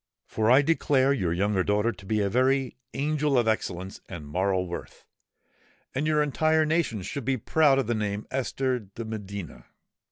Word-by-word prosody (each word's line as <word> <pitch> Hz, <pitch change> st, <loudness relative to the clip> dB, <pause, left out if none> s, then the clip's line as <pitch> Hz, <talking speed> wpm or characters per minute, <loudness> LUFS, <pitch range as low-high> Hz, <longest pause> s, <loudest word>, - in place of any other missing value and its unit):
For 110 Hz, 0 st, 0 dB
I 130 Hz, +4 st, +6 dB
declare 140 Hz, -3 st, +2 dB
your 95 Hz, -11 st, -1 dB
younger 95 Hz, +2 st, +1 dB
daughter 105 Hz, +4 st, +1 dB
to 100 Hz, -, -13 dB
be 110 Hz, 0 st, +1 dB
a 100 Hz, -, +1 dB
very 130 Hz, +4 st, +1 dB, 0.2 s
angel 150 Hz, -1 st, +1 dB
of 120 Hz, -2 st, +2 dB
excellence 95 Hz, -4 st, -2 dB
and 85 Hz, -5 st, -7 dB
moral 95 Hz, +4 st, 0 dB
worth; 85 Hz, -, -8 dB, 0.9 s
and 145 Hz, +4 st, -1 dB
your 150 Hz, -1 st, +3 dB
entire 155 Hz, +2 st, +2 dB
nation 155 Hz, -, 0 dB
should 135 Hz, +8 st, -5 dB
be 135 Hz, +2 st, 0 dB
proud 145 Hz, +4 st, +3 dB
of 135 Hz, -, +1 dB
the 120 Hz, -, 0 dB
name 105 Hz, -2 st, -2 dB
of -, -, -19 dB
Esther 130 Hz, -1 st, -1 dB
de 110 Hz, +2 st, -9 dB
Medina!" 100 Hz, -, -7 dB
115 Hz, 180 wpm, -27 LUFS, 100-135 Hz, 0.9 s, I